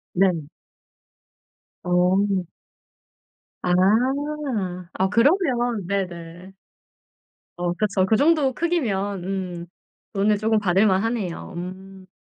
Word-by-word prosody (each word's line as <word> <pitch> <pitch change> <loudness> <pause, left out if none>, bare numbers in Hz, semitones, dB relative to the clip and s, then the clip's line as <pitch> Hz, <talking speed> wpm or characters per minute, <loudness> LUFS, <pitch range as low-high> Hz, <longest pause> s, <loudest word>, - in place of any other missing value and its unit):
네. 180 -4 +2 1.4
어. 185 +2 +2 1.2
아. 180 - +1 1.2
아, 190 - +1
그러면 240 - +2
네네. 180 -1 -4 1.0
어 175 0 -1
그쵸. 195 -1 +1
그 220 - +3
정도 290 -1 +3
크기면 205 - -1
음, 180 -3 -4 0.5
돈을 205 +1 +2
조금 220 0 +2
받을만 195 +1 +3
하네요. 205 -6 -3
음. 185 +1 -8
195 Hz, 145 characters per minute, -23 LUFS, 180-220 Hz, 1.4 s, 그